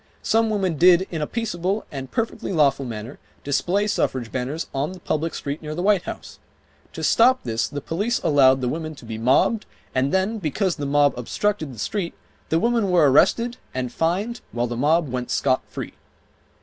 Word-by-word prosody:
Some 225 0 +2
women 190 -6 0
did 180 +3 +6
in 160 -3 -3
a 150 - -1
peaceable, 205 -3 -2
and 135 -2 -6
perfectly 230 - -3
lawful 140 -5 +2
manner, 115 +3 -7 0.2
display 180 +8 +1
suffrage 130 - -1
banners 135 +6 -3
on 145 +6 -2
the 185 - -11
public 160 0 -2
street 140 +2 -4
near 155 0 -5
the 175 - -3
White 200 -2 +3
House. - - -8 0.5
To - - -6
stop 255 +3 +4
this 115 -1 -1
the 145 - -6
police 205 - -1
allowed 135 -3 +5
the 125 - 0
women 155 +3 -4
to 130 - -13
be 110 -1 -6
mobbed, 135 - +2 0.3
and 130 +2 +1
then 195 +4 0
because 180 +2 -1
the 145 - -3
mob 145 0 +3
obstructed 160 - -1
the 120 - -11
street, 175 - -3 0.3
the 160 - +2
women 230 -2 +1
were 165 -6 +5
arrested 235 - +3 0.2
and 125 -2 -3
fined, 195 +9 -1
while 120 0 -1
the 120 0 -4
mob 155 +6 +2
went 125 -1 -4
scot 130 -2 +1
free - - -7
155 Hz, 190 wpm, -23 LUFS, 135-195 Hz, 0.5 s, did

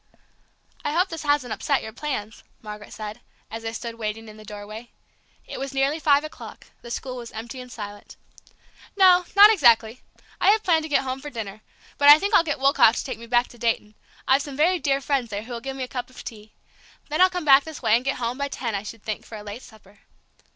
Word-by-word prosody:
"I 295 - -2
hope 360 +4 +2
this 325 -1 -6
hasn't 290 -5 0
upset 280 -2 0
your 220 - -8
plans," 230 -6 -5 0.2
Margaret 210 -1 -9
said, 215 +2 -7 0.3
as 225 - -6
they 225 0 -4
stood 230 0 -7
waiting 220 +1 -4
in 215 - -11
the 215 - -13
doorway. 215 +3 -9 0.6
It - - -7
was 275 0 -5
nearly 275 +4 +1
five 290 -2 +3
o'clock, 310 - -10 0.2
the 235 - -11
school 255 +1 -5
was 235 -1 -8
empty 235 +4 -7
and 250 0 -12
silent. 205 -2 -9 0.8
"No, 365 -2 +6
not 410 +2 +9
exactly. 235 - +3 0.4
I - - +4
had 435 +1 +3
hoped 330 -3 +3
to 315 - -7
get 285 - +2
home 260 0 -4
for 295 - -7
dinner. 215 -5 -7 0.4
But 285 0 +7
I 295 - +11
think 400 +6 -2
I'll 350 - +6
get 300 -3 -2
Woolcock 270 -4 +5
to - - -2
take 260 - -5
me 235 - -10
back 240 +1 +2
to 240 - -16
Dayton; 225 -2 -1 0.3
I've 265 +2 +4
some 280 -2 -7
very 350 +4 +3
dear 275 -3 0
friends 270 -4 -1
there 205 0 -4
who'll 235 0 -7
give 270 +2 -5
me 265 - -3
a - - -4
cup 250 -1 -5
of 255 - -12
tea. 215 -1 -10 0.6
Then 305 +4 0
I'll 370 - +7
come 360 -3 -4
back 275 -1 +7
this 315 -4 -9
way 220 -1 +4
and 240 - 0
get 275 +1 -1
home, 245 +2 -3
by 280 - -1
ten, 240 -5 -4
I 200 - -2
should 215 +1 -10
think, 215 -1 -4
for 220 - -10
a 210 - -10
late 210 +4 -8
supper." 205 -4 -18
250 Hz, 235 wpm, -24 LUFS, 220-290 Hz, 0.8 s, I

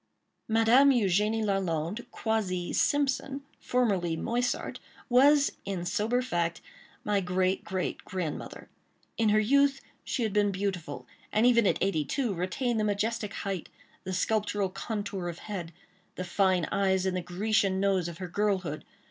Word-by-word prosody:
Madame 225 +5 +5
Eugénie 215 -2 +2
Lalande, 195 +2 -1
quasi 195 -7 -2
Simpson—formerly 260 - 0
Moissart—was, 250 - +1
in 185 -3 -4
sober 215 +7 0
fact, 170 -7 -1 0.4
my 205 -1 +1
great, 185 +1 0
great, 185 -1 -3
grandmother. 180 -6 -5 0.5
In 225 -1 +3
her 215 +1 +4
youth 275 +5 +3 0.2
she 245 - -2
had 215 -3 -1
been 205 -1 +3
beautiful, 190 -3 -3 0.3
and 215 +3 +3
even 235 -4 +5
at - - +2
eighty 190 -6 +1
two, 240 - -1
retained 220 +7 -1
the - - +1
majestic 210 +1 -1
height, 195 -4 -3 0.3
the 185 - -5
sculptural 205 0 0
contour 200 -2 -4
of 170 - -6
head, 185 -6 -6 0.4
the 185 - -4
fine 185 -1 +2
eyes 190 -1 +2
and 190 -1 0
the 185 - -1
Grecian 190 +2 +1
nose 190 -3 +1
of 170 -1 -7
her 185 -1 -5
girlhood. 185 -5 -1
200 Hz, 140 wpm, -29 LUFS, 185-225 Hz, 0.5 s, Madame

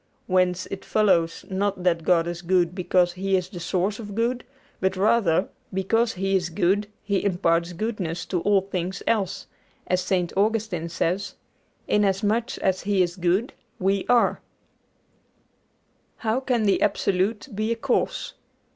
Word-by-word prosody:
Whence 185 -1 +1
it 195 - -5
follows, 170 -6 +2
not 190 -1 -1
that 170 -2 +2
God 170 -1 +3
is 175 0 -4
good 175 -1 +2
because 180 -1 +2
He 195 +2 0
is 180 0 -3
the 180 - -8
source 190 +5 -1
of 205 -3 -7
good, 240 +2 0 0.4
but 190 0 0
rather, 195 -3 +2 0.2
because 225 +5 +1
He 195 +1 0
is 175 -2 0
good, 195 +4 +1 0.2
He 200 -2 0
imparts 170 -3 +1
goodness 180 -4 -3
to 180 -3 -2
all 200 0 +3
things 185 -1 -4
else; 205 -5 0 0.4
as 185 0 +1
St. 180 -1 0
Augustine 205 -5 0
says, 180 +4 -1 0.5
"Inasmuch 210 +4 +1
as 190 -1 0
He 195 -2 +2
is 175 -1 -3
good, 185 +6 0 0.2
we 195 +1 0
are." 245 -1 +3 1.8
HOW 220 +3 +2
CAN 250 -4 0
THE 200 -2 +2
ABSOLUTE 205 +3 0
BE 215 +3 -1
A - - +1
CAUSE? 230 - -1
190 Hz, 145 wpm, -24 LUFS, 180-210 Hz, 1.8 s, God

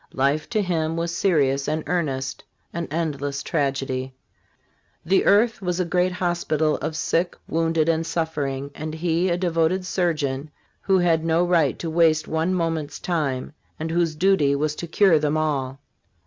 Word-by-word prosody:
Life 140 +3 +1
to 215 -3 +1
him 165 -3 -1
was 170 0 -2
serious 140 -8 +2
and 155 +1 -1
earnest 140 -7 -2
— - - -43
an 170 -1 -3
endless 145 -3 -2
tragedy. 135 -3 -2 0.9
The 190 +3 +3
earth 220 +2 +3
was 180 -1 -2
a 180 - +1
great 180 +2 +1
hospital 170 -4 0
of 155 - -4
sick, 170 +3 0
wounded 165 -1 +1
and 165 0 +2
suffering, 145 -5 -3
and 155 +2 -5
he 170 +2 0
a 170 - +1
devoted 175 +1 +1
sur 175 -3 0
geon, 140 -1 -3 0.3
who 190 -1 +2
had 170 -3 +2
no 165 +2 +2
right 165 -6 +2
to 165 - -4
waste 160 -1 +3
one 160 +3 0
moment's 165 -5 -2
time, 150 -6 -2 0.3
and 160 +1 -3
whose 165 -2 +1
duty 155 -5 +3
was 150 +1 0
to 170 - -5
cure 170 -1 +4
them 150 +1 0
all. 135 -4 -1
160 Hz, 165 wpm, -23 LUFS, 145-175 Hz, 0.9 s, cure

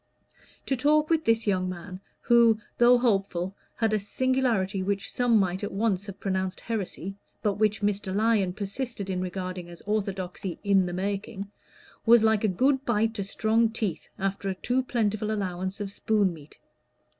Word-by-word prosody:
To 270 - 0
talk 300 +4 +2
with 320 -1 +2
this 225 0 +3
young 185 -3 +1
man, 185 +1 -7 0.2
who, 235 -2 +5 0.2
though 240 +1 +7
hopeful, 195 -6 0 0.2
had 225 -2 +1
a 215 - +2
singularity 225 -3 0
which 200 +1 -2
some 245 -2 +3
might 190 -1 0
at 205 - -3
once 200 -1 0
have 195 -1 -8
pronounced 190 -1 -2
heresy, 195 -4 -4 0.3
but 205 -1 0
which 215 -1 +1
Mr. 200 -2 -1
Lyon 210 -4 +2
persisted 200 0 -4
in 180 -1 -1
regarding 185 -1 -4
as 170 - -11
orthodoxy 195 -3 -3
"in 195 -3 +3
the 175 - -4
making," 200 +1 -3 0.5
was 235 -1 +6
like 220 -1 +3
a - - +4
good 265 +8 +2
bite 225 -3 +1
to 205 -3 -3
strong 220 +3 +2
teeth 215 -6 -3
after 195 0 -2
a 190 - -2
too 245 +7 0
plentiful 215 -4 -1
allowance 190 -1 -3
of 200 -1 -4
spoon 205 -3 +1
meat. 155 -2 -14
205 Hz, 165 wpm, -27 LUFS, 190-225 Hz, 0.5 s, though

